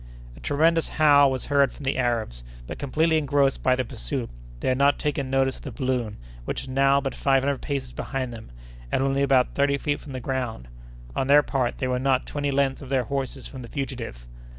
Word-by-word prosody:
A - - -14
tremendous 165 +3 +2
howl 145 -2 +5
was 130 -1 -3
heard 140 -1 +3
from 150 - -12
the 135 0 0
Arabs, 115 - -1 0.2
but, - - -7
completely 160 +4 +2
engrossed 140 -2 +1
by 130 - +3
the 130 0 -1
pursuit, - - -4 0.3
they - - -1
had 130 +1 +1
not 140 +1 +4
taken 145 -3 -2
notice 135 0 +1
of - - -14
the - - -7
balloon, 125 -6 -2 0.3
which - - -3
was - - -10
now 135 +1 +4
but 135 -1 -3
five 135 -1 +2
hundred 140 -1 -1
paces 140 -3 -3
behind 130 -3 -4
them, 110 -1 -10 0.4
and 130 - +1
only 135 0 +1
about 135 -2 +3
thirty 140 0 +2
feet 145 +1 -1
from 140 - -10
the 130 - -4
ground. 125 - -3 0.5
On 130 - 0
their 145 +1 +6
part, 130 -4 -1
they 130 - -1
were 125 0 0
not 130 0 +1
twenty 145 -1 -2
lengths 135 0 +1
of 135 - -9
their 135 -2 +2
horses 135 0 -4
from 130 - -8
the 120 - -9
fugitive. 125 - -5
135 Hz, 220 wpm, -25 LUFS, 130-140 Hz, 0.5 s, their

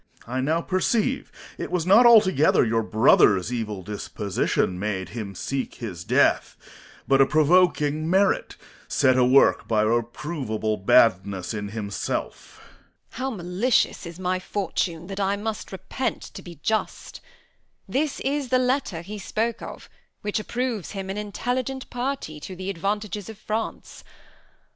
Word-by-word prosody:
Corn. 125 +2 -5
I - - +1
now 160 +5 +1
perceive 215 +8 0 0.3
it - - -4
was 180 -3 -1
not 215 +6 +7
altogether 190 - +5
your 115 0 +1
brother's 110 -2 +4
evil 105 -5 -4
disposition 100 -2 -2
made 95 -2 -3
him 105 -4 -6
seek 135 +8 -3
his 90 -8 -7
death; - - +2 0.5
but 135 0 +5
a 135 - +5
provoking 155 -1 +3
merit, 190 +2 +2 0.3
set 130 -1 +3
awork 130 +2 +4
by 110 -2 +2
a - - +2
reproveable 120 -2 -2
badness 100 -2 +3
in 105 -1 -4
himself. 105 -2 -5 0.5
Edm. - - -17
How 260 +2 -1
malicious 195 0 0
is 170 0 -9
my 185 0 -1
fortune 180 -3 -2
that 195 +2 -6
I 200 0 +1
must 215 +1 -5
repent 195 +5 -3
to - - -8
be 175 -1 -11
just! 220 0 -2 0.7
This 285 +1 -1
is 275 -1 -1
the 255 - +4
letter 250 - 0
he 205 +4 -7
spoke 225 +4 -2
of, - - -9 0.3
which 210 +1 -1
approves 235 -3 -3
him 195 -1 -4
an 195 - -5
intelligent 250 +5 -3
party 245 - -3
to 185 +5 -8
the 190 +2 -4
advantages 205 +2 -3
of 220 - -9
France. 215 +1 -5
180 Hz, 145 wpm, -24 LUFS, -, 0.7 s, not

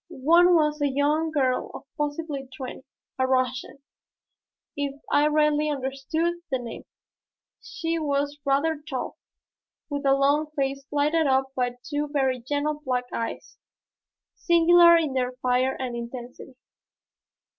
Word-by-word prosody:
One 345 +4 +6
was 300 -2 +2
a 290 - +3
young 295 +4 +1
girl 265 -5 0
of - - -8
possibly 295 -2 -3
twenty 260 -2 -7 0.4
a 260 - +2
Russian 255 +1 -1 0.9
if 285 -1 -3
I 295 +1 +4
rightly 300 0 +2
understood 285 +5 -2
the 265 - 0
name. 240 -2 -8 0.8
She 335 -3 -3
was 285 -1 -1
rather 290 +3 +1
tall, 280 -4 -5 0.7
with 285 0 -3
a 270 - +5
long 285 +3 +2
face 275 -1 -1
lighted 300 +2 +1
up 265 0 +1
by 245 -1 -2
two 295 0 -2
very 265 -3 0
gentle 290 +4 -2
black 250 -2 -1
eyes, 230 - -5 0.7
singular 340 0 +6
in 310 -5 -1
their 255 -1 -1
fire 255 +1 0
and 255 -2 -3
intensity. 240 +2 -8
285 Hz, 130 wpm, -25 LUFS, 260-305 Hz, 0.9 s, One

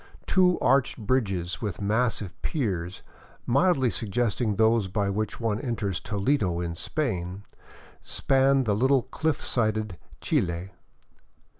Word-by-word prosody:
Two 180 -2 +4
arched 135 0 +3
bridges 100 -7 -1
with 100 -7 -3
massive 105 -2 0
piers, 95 - -2 0.4
mildly 135 -1 +3
suggesting 110 +1 -1
those 110 -1 +3
by 100 +1 -1
which 105 +1 -3
one 110 -2 -1
enters 110 -8 -2
Toledo 100 -4 0
in 85 -1 -3
Spain, 95 - -3 0.6
span 135 0 +2
the 105 -4 +1
little 130 +3 +3
cliff 155 +2 -2
sided 110 -5 -1 0.2
Chili. 85 +1 -1
110 Hz, 115 wpm, -26 LUFS, 95-130 Hz, 0.6 s, Two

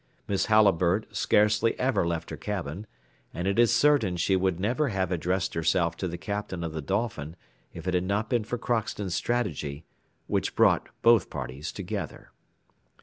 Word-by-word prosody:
Miss 100 -2 0
Halliburtt 100 -2 +3
scarcely 105 +2 +3
ever 125 -9 +1
left 85 -1 -3
her - - -3
cabin, 100 -1 -5 0.5
and 90 +2 -2
it 100 +3 +1
is 120 -1 +5
certain 140 -12 +3
she 95 +3 +2
would 95 -2 0
never 120 +10 +1
have 95 -5 -1
addressed 90 +2 -1
herself 85 0 +1
to 95 - -2
the 85 0 -5
Captain 95 0 -4
of 80 -2 -4
the 80 - -3
Dolphin 95 -3 -2 0.4
if - - -9
it 90 - 0
had 90 0 +1
not 100 +3 0
been 120 -2 +1
for 120 +3 -3
Crockston's 110 -5 -2
strategy, 80 - -2 0.4
which - - -1
brought - - +3
both 115 -1 +5
parties 70 +4 -5
together. - - -6
95 Hz, 165 wpm, -27 LUFS, 85-110 Hz, 0.5 s, is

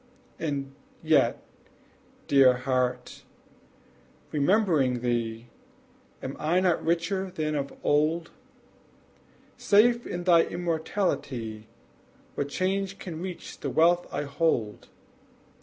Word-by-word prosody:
And 140 -3 -3 0.3
yet, - - +2 0.8
dear 135 -2 +6
heart' 125 -1 -2 1.1
remembering 150 - +2
thee, 120 -1 -2 0.7
Am 130 - -5
I 165 +4 +2
not 180 -3 +1
richer 180 +3 0
than 155 -3 -3
of 140 -2 -2
old? 155 +3 +1 1.3
Safe 235 +4 +3
in 175 0 -4
thy 175 -2 +6
immortality, 155 - -3 0.7
What 140 - -3
change 195 +4 -1
can 165 -3 -7
reach 180 -1 -7
the - - -3
wealth 175 +2 +3
I - - -2
hold? 140 -7 -1
155 Hz, 95 wpm, -27 LUFS, 130-175 Hz, 1.3 s, dear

